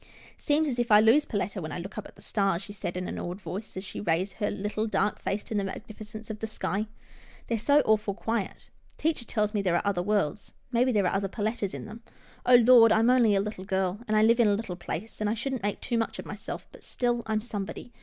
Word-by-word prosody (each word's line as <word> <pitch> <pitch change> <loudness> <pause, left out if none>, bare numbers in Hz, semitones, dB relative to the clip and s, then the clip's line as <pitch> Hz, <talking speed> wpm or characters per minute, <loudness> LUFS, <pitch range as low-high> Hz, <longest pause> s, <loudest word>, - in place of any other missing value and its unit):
" - - -20
Seems 305 +1 +1
as 250 -4 -1
if 240 -2 0
I 210 - +9
lose 230 +8 +5
Perletta 195 -2 -2
when 155 -1 -5
I 145 - -4
look 180 +3 -7
up 215 - -5
at - - -18
the - - -16
stars," 195 -3 0
she 205 - -9
said, 180 -3 -4
in 180 - -3
an - - -4
awed 175 +2 -5
voice, 200 +1 -6
as 190 - -4
she 195 - -7
raised 180 0 0
her 205 - 0
little, 210 +2 -2
dark 210 -1 0
face 205 +1 -2
to - - -6
the 205 -2 +1
magnificence 215 +2 -8
of 215 - -7
the 220 - -3
sky. 210 0 -2 0.3
" - - -24
They're 230 -2 0
so 285 +6 +4
awful 215 -2 +2
quiet. 225 -1 -3 0.3
Teacher 310 -6 -1
tells 210 -1 0
me 205 - +1
there 180 -3 +1
are 175 - 0
other 200 -3 +1
worlds. 205 -1 -1 0.2
Maybe 250 +1 +3
there 205 -5 +2
are 180 - +1
other 195 0 0
Perlettas 210 -1 -2
in - - -6
them 220 +2 -10 0.2
— - - -27
Oh 250 - +8
Lord! 235 -1 +8
I'm 225 +3 +5
only 235 -5 +5
a 195 - +3
little 210 -2 -5
girl, 190 0 -1
and 215 0 +2
I 215 - +5
live 230 +2 +5
in 235 - +6
a 205 - +4
little 200 -4 -4
place, 185 +5 -6
and 210 - +1
I 220 - 0
shouldn't 260 +2 -3
make 205 0 -2
too 235 -2 0
much 225 - -2
of - - -7
myself, - - -7
but - - -15
still 240 -1 0
I'm 220 -1 +1
somebody. 215 +1 -6
210 Hz, 265 wpm, -28 LUFS, 195-230 Hz, 0.3 s, I